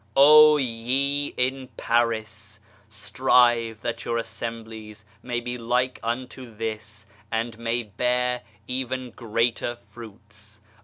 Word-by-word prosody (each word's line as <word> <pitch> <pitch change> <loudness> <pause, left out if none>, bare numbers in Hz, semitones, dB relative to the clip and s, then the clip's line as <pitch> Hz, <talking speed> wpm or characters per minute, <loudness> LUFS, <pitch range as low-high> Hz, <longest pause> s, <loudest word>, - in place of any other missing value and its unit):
Oh 150 +2 +8
ye 135 +3 0
in 130 +1 -1
Paris, 110 -3 -1 0.3
strive 115 0 +2
that 115 0 -3
your 115 - -1
assemblies 110 -2 -7 0.2
may 120 -1 -2
be 120 +1 -5
like 125 +2 0
unto 120 0 -5
this, 110 -1 -5 0.3
and 115 0 -2
may 115 +1 -1
bear 125 +3 0 0.3
even 130 0 -3
greater 115 +1 -1
fruits 105 -3 -14
115 Hz, 105 wpm, -25 LUFS, 110-125 Hz, 0.3 s, Oh